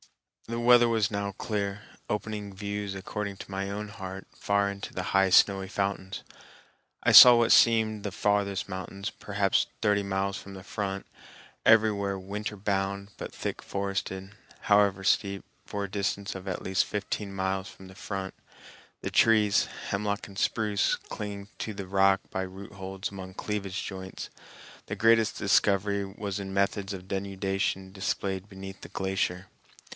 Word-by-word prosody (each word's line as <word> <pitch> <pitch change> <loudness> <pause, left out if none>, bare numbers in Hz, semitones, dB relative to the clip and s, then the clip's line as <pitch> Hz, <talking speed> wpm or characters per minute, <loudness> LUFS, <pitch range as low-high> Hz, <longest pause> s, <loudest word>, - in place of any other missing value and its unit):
The 115 0 -3
weather 120 0 +6
was 110 -2 +1
now 100 -1 -2
clear, 100 0 -3 0.3
opening 105 -1 -3
views 100 0 -4
according 100 +1 -4
to - - -10
my 95 0 -2
own 105 +1 -4
heart 95 -2 -7
far 100 0 +1
into 100 0 -7
the 90 - -3
high 95 0 +5
snowy 95 +1 +5
fountains. 100 -1 -2 0.8
I - - +4
saw 125 -1 +12
what 120 -1 +3
seemed 110 -2 +4
the 100 - -3
farthest 100 0 0
mountains, 95 +1 -5
perhaps 100 -1 0
thirty 105 -2 +2
miles 100 0 -1
from 100 0 -10
the 95 - -9
front, 100 -1 -4 0.6
everywhere 105 -3 +4
winter 105 +2 -5
bound, 100 0 -2
but - - -6
thick - - -4
forested, 100 -1 -3 0.3
however 100 -2 +3
steep, 100 0 +1 0.2
for 100 0 -4
a - - -8
distance 100 0 -2
of 95 0 -8
at 95 - -3
least 95 0 +2
fifteen 105 0 -4
miles 95 0 -2
from 95 - -13
the 95 - -13
front, 95 -1 -5 0.7
the - - -4
trees, 110 -3 +4 0.2
hemlock 100 +1 -2
and 100 -2 -12
spruce, 105 -3 +1
clinging 100 -1 -7
to 110 - -3
the 100 -1 -6
rock 95 0 +4
by 95 - -2
root 95 +2 -8
holds 95 0 -5
among 95 -1 -8
cleavage 100 -3 -3
joints. 95 -1 -7 0.6
The - - -3
greatest 115 -1 +4
discovery 100 0 +2
was 100 0 -5
in 95 -1 -5
methods 100 0 0
of 95 -2 -7
denudation 95 -1 -2
displayed 95 0 -2
beneath 95 0 -9
the - - -10
glacier. 95 -1 -1
100 Hz, 155 wpm, -28 LUFS, 95-105 Hz, 0.8 s, saw